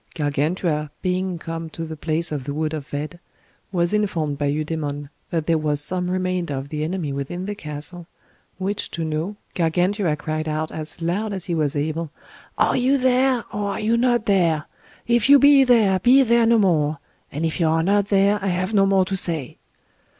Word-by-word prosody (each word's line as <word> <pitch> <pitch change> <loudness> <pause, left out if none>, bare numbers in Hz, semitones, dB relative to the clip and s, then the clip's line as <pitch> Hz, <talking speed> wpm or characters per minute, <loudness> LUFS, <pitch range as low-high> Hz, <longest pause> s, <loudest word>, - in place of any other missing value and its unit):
Gargantua, 150 +1 -1
being 185 -1 -1
come 165 0 -6
to 165 +1 -6
the 160 0 -6
place 160 +2 -1
of 145 -4 -4
the 140 0 -4
wood 155 0 -1
of 150 -2 -5
Vede, 150 +4 -5 0.5
was 175 0 0
informed 165 -9 -1
by 145 - 0
Eudemon 145 -1 -3 0.2
that 165 -2 -1
there 165 -1 +2
was 150 -1 0
some 180 +4 0
remainder 185 -4 -1
of 135 +1 -5
the 150 0 -3
enemy 160 -3 -3
within 140 +7 -4
the 205 - -3
castle, 165 0 -6 0.5
which 195 +2 -3
to 165 - -4
know, 160 +6 -3 0.2
Gargantua 175 +1 +1
cried 155 +1 -4
out 155 +1 -2
as 155 +1 -7
loud 200 +5 -1
as 190 -3 -5
he 175 - -2
was 155 -2 0
able, 155 +2 -2 0.5
Are - - +3
you 260 +2 +3
there, 255 -1 +2
or 205 -1 -2
are - - -4
you 220 +2 +1
not 240 -1 +2
there? 170 -6 +2 0.4
If 235 +1 +2
you 285 - +9
be 280 0 +7
there, 220 -7 +4
be 260 +7 +6
there 235 -1 +3
no 230 0 +5
more; 155 -7 +2 0.3
and 150 +4 -2
if 160 +3 -2
you 165 - +3
are 160 +1 +2
not 200 +2 +2
there, 200 0 +2
I - - 0
have 185 +3 -1
no 195 -1 +4
more 195 -1 +3
to 195 - -2
say. 165 -8 -1
170 Hz, 195 wpm, -22 LUFS, 155-200 Hz, 0.5 s, you